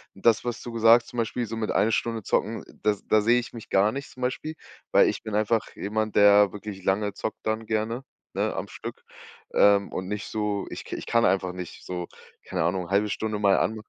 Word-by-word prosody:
Das, 110 +3 +3
was 120 -2 -3
du 120 - -7
gesagt, 115 +1 +6
zum 120 - -10
Beispiel, 120 +1 -1
so 115 - -5
mit 110 -1 -1
1 110 - +2
Stunde 115 -1 -1
zocken, 110 +4 -1 0.2
das 105 -1 0
da 110 - +4
sehe 120 +3 +4
ich 120 - -7
mich 115 -2 -10
gar 100 +2 +3
nicht 140 +3 -6
zum 130 - -13
Beispiel, 130 +5 -2 0.4
weil - - +6
ich - - -4
bin 110 -2 -4
einfach 110 +1 0
jemand, 110 +1 -2
der 100 -1 +6
wirklich 105 -2 -7
lange 100 +2 +1
zockt 110 +2 -5
dann 110 +1 -1
gerne, 110 +4 -1 0.3
ne, - - -1
am - - -4
Stück, 475 - -8 0.5
ähm, 100 -1 +4
und 95 - -3
nicht 105 0 -4
so 105 -2 -2
ich - - -8
ich - - -5
kann 115 0 +3
einfach 90 -1 +1
nicht 90 -2 -8
so 90 -1 -4 0.4
keine - - -1
Ahnung, 90 +1 -1
0,5 105 +2 +2
Stunde 110 0 -2
mal 100 -1 +4
an 110 - 0
105 Hz, 215 wpm, -26 LUFS, 100-115 Hz, 0.5 s, gesagt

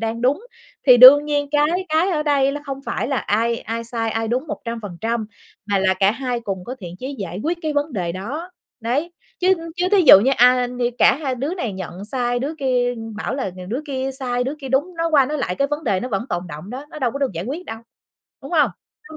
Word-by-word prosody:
đang 225 +1 -3
đúng. 290 - +1 0.4
Thì 250 -1 +9
đương 270 +4 +10
nhiên 290 -1 -1
cái 310 +6 +1
cái 320 +5 +2
ở 305 -3 0
đây 275 -2 +2
không 275 0 -5
phải - - -3
là 275 - 0
ai 230 +1 0
ai 230 +1 -5
sai, 230 -1 -2
ai 225 0 -2
đúng 255 +6 -1
100 225 -2 -4 0.4
mà 200 -1 +1
là 190 0 +2
cả 195 +1 +3
hai 250 0 -3
cùng 195 -5 -5
có 255 - -6
thiện 175 -1 -8
chí 270 +2 -5
giải 185 -3 -5
quyết 340 +2 -1
cái 310 -1 -1
vấn 290 +1 -1
đề 175 -6 -2
đó. 275 - -6 0.3
Đấy. 280 +10 -1 0.3
Chứ 370 +1 +4 0.2
chứ 360 +1 +1
thí 395 -2 +6
dụ 225 - +9
như, 260 - +2
a, 250 +1 +5
như 245 0 -2
cả - - +5
hai 275 -4 -2
đứa 280 +8 -3
này 245 - -3
nhận 190 0 -7
sai, 245 +1 -1
đứa 280 +6 -3
kia 245 -2 +1 0.2
bảo 230 +4 -3
là 260 -8 -3
nhường 185 0 -9
đứa 245 +7 -2
kia 265 -1 -2
sai, 245 -2 -1
đứa 270 - -3
kia 270 - -7
đúng, 290 +8 0
nói 330 0 0
qua 280 -4 +5
nói 300 +2 -3
lại 180 -9 -2
cái 275 +7 0
vấn 295 +1 -3
đề 195 -5 +1
nó 250 - -4
vẫn 210 +1 -2
tồn 175 +1 -3
đọng 155 +7 -9
đó, 265 +3 -6
nó 305 - -8
đâu 250 -4 0
có 280 - -5
được 275 -6 -1
giải 170 +2 -5
quyết 300 +9 -5
đâu, 225 - -7 0.6
đúng 275 - -9
hông? 295 - +4 0.4
Nó 315 - -9
255 Hz, 245 wpm, -21 LUFS, 225-290 Hz, 0.6 s, đương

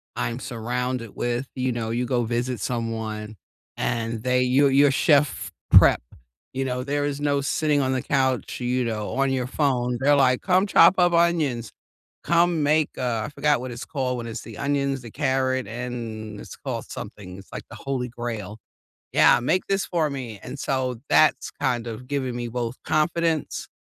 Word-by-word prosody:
I'm 115 +1 -2
surrounded 125 -1 -3
with, 120 +2 -2
you 130 0 0
know, 115 -1 -3
you 120 +2 -1
go 125 -1 0
visit 120 0 -2
someone 110 -2 -3 0.4
and 115 -2 -2
they 125 0 +2
you're 135 +2 +4
you're 140 +1 +5
chef 145 +1 +2 0.2
prep. - - +7 0.5
You 135 +1 -1
know 125 -1 -2
there 145 +1 -1
is 145 0 -3
no 145 -1 +1
sitting 145 +1 +1
on 130 -1 0
the 130 - 0
couch 130 -2 0
you 125 +1 0
know 110 -2 -3
on 135 0 +1
your 130 -2 0
phone. 125 -3 0
They're 145 +2 +5
like, 130 -2 +3
"Come 185 +1 +3
chop 180 -2 +6
up 175 -1 +4
onions, 160 -9 +1 0.5
come 170 -1 +3
make" 155 +1 +3
uh, 120 -4 -1
I - - -5
forgot 150 -2 +1
what 130 - -5
it's 120 - -7
called 130 -5 -2
when 120 - -5
it's 115 - -5
the 115 -3 -10
onions, 140 -1 0
the 115 -2 -10
carrot 130 -2 0
and 115 -2 -6
it's - - -10
called - - -4
something- 90 -2 -8
it's 100 - -14
like - - -6
the - - -10
holy 130 -2 -3
grail. 115 -3 -5 0.5
Yeah, - - +6
"Make 160 +9 0
this 195 0 0
for 160 -4 0
me," 125 -6 -6
and 130 +3 -7
so 130 -2 -1
that's 155 - +4
kind 120 -2 -1
of 115 +2 -7
giving 130 -3 -2
me 120 -1 -3
both 120 +1 -3
confidence 160 0 0
130 Hz, 180 wpm, -24 LUFS, 120-140 Hz, 0.5 s, prep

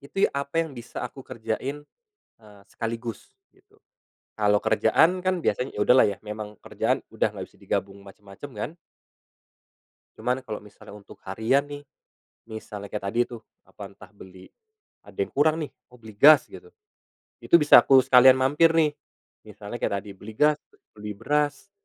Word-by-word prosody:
Itu 145 +8 -1
ya - - -8
apa 140 +4 -1
yang 160 - -10
bisa 120 -2 -8
aku 135 - -9
kerjain, 125 +6 -5 0.6
eee, 105 -2 -18
sekaligus 115 0 -6 0.2
gitu. 405 +2 -30 0.6
Kalau 105 -1 +3
kerjaan 160 +11 +3
kan 185 -1 -1
biasanya, 125 +2 -2
ya - - -3
udahlah 125 +2 +5
ya, 100 - -4
memang 105 0 -7
kerjaan - - -1
udah - - 0
nggak - - -6
bisa - - -26
digabung 100 0 -3
macem-macem 100 +7 -12
kan. 130 +10 -5 1.4
Cuman 125 +3 -2
kalau 105 -2 -6
misalnya 105 0 -15
untuk 105 -1 -15
harian 110 +9 0
nih, 145 0 -9 0.7
misalnya 105 -2 -8
kayak 105 -2 -5
tadi 115 +4 -1
tuh, 120 -2 -9 0.2
apa, 100 -1 -11
entah 100 -1 -16
beli 95 -2 -15 0.6
ada - - -17
yang 405 -1 -3
kurang 155 +2 +2
nih, - - -10 0.2
oh - - -15
beli 110 -2 -13
gas 145 +7 +7
gitu, 440 - -12 0.8
itu - - -1
bisa 150 - +8
aku 135 -1 +6
sekalian 130 +1 +7
mampir 150 +5 +3
nih, 160 -2 +3 0.6
misalnya - - -9
kayak 100 - -1
tadi 105 - -11
beli 105 +3 -11
gas, 150 +5 +3 0.4
beli 105 0 -6
beras, 145 - -2
120 Hz, 160 wpm, -25 LUFS, 105-145 Hz, 1.4 s, bisa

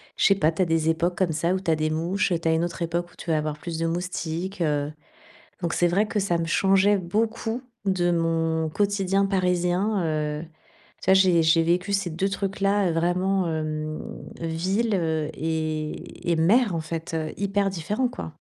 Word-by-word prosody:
je - - +2
sais 195 - +5
pas, 160 -5 +3
tu 175 - -1
as - - +4
des 165 -1 +1
époques 175 +2 0
comme 180 -4 +1
ça 170 +4 +1
où 190 - 0
tu 190 - -4
as 160 - +4
des 155 0 0
mouches. 170 +7 0
Tu - - -2
as 160 - +4
une 165 +1 +1
autre 175 0 -4
époque 170 +1 -1
où - - -21
tu - - -8
vas 155 - +3
avoir 150 0 -2
plus 165 0 -5
de 165 - 0
moustiques. 175 +1 -3
Heu, 150 -2 0 0.7
donc 170 -2 -1
c'est 175 - +3
vrai 200 +5 +2
que 215 - -1
ça 185 -4 +1
me 165 - -1
changeait 195 +3 +4
beaucoup 225 +5 -1 0.2
de 180 -2 +1
mon 165 -1 0
quotidien 200 0 +1
parisien, 185 +1 +1
heu. 150 -1 -1 0.6
Tu - - +1
vois, - - +8
j'ai 185 -3 +5
j'ai 160 +1 +4
vécu 180 +4 +1
ces 200 -2 +1
2 170 +5 -1
trucs-là, 200 0 0
heu, 170 - 0
vraiment, 180 +3 +1
hem, 155 -1 -3 0.4
villes, 185 +7 0
heu 160 -4 0
et 155 +1 -3
et - - +2
mer, 200 +6 +3
en 165 - -1
fait, 160 +1 -5
heu. 160 -1 -2
Hyper 200 0 0
différents, 195 +8 -1
quoi. 250 - -8
175 Hz, 200 wpm, -25 LUFS, 160-195 Hz, 0.7 s, vois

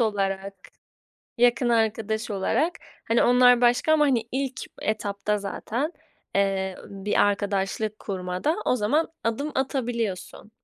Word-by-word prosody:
olarak, 195 -3 -1 0.8
yakın 240 0 +3
arkadaş 220 -1 0
olarak, 230 - +1 0.3
hani, 230 +1 +2
onlar 245 0 +6
başka 245 +5 +3
ama, 305 -1 +5
hani, 240 -5 +1
ilk 265 0 -2 0.2
etapta 210 -1 -1
zaten, 235 - -3 0.4
eee, 195 -1 0
bir 200 +1 -1
arkadaşlık 205 +1 -1
kurmada 185 - -2
o 250 - +2
zaman 270 +9 +1 0.2
adım 280 +7 -1
atabiliyorsun. 235 -7 -3
220 Hz, 115 wpm, -25 LUFS, 200-245 Hz, 0.8 s, onlar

